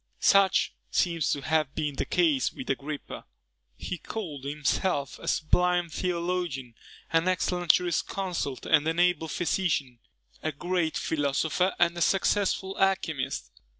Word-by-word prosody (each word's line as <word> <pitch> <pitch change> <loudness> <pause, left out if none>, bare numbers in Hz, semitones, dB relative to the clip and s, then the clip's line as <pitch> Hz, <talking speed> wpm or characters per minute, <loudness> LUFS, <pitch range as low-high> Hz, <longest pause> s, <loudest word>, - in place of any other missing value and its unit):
Such 195 -1 +4 0.2
seems 170 -3 +1
to 140 - 0
have 155 -1 0
been 150 -3 -2
the - - -2
case 310 -7 +2
with 265 - -4
Agrippa. 145 +1 -5 0.5
He 180 - -5
called 155 -12 -6
himself 145 +1 -1
a - - -10
sublime 175 +2 +2
theologian, 170 -7 -2 0.4
an 165 +2 +3
excellent 180 -2 +2
jurisconsult, 175 -4 -2
an 160 +1 +3
able 175 -2 +2
physician, 150 -6 -1 0.4
a 155 - -1
great 175 0 -1
philosopher, 160 +5 0
and 170 0 +3
a 175 - -4
successful 195 +1 +1
alchymist. 160 - 0
170 Hz, 120 wpm, -28 LUFS, 150-180 Hz, 0.5 s, Such